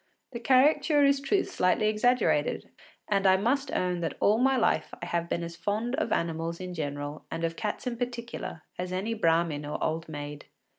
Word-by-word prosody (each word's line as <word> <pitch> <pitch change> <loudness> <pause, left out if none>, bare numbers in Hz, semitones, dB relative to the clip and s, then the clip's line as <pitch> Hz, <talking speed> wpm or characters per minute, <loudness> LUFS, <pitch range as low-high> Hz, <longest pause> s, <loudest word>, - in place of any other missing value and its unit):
The 235 - -5
caricature 285 +4 +4
is 280 0 +4
truth 380 +8 0
slightly 185 +4 +2
exaggerated, 215 -8 +1 0.4
and 195 -2 +2
I 190 0 +6
must 265 +7 0
own 180 -1 0
that 170 - -3
all 215 +2 +3
my 265 +1 +3
life - - +1
I - - -5
have 170 0 -2
been 170 - -1
as 170 0 -6
fond 210 +8 -2
of - - -1
animals 165 0 -1
in 185 -1 -6
general 145 -2 -5
and 165 0 -4
of 165 0 -1
cats 210 +6 -4
in 245 -2 -2
particular 235 -8 -5 0.2
as 180 0 -3
any 195 +5 -1
brahmin 165 -6 +1
or 145 +1 -4
old 165 +1 -2
maid. 145 -1 -7
185 Hz, 190 wpm, -28 LUFS, 165-240 Hz, 0.4 s, I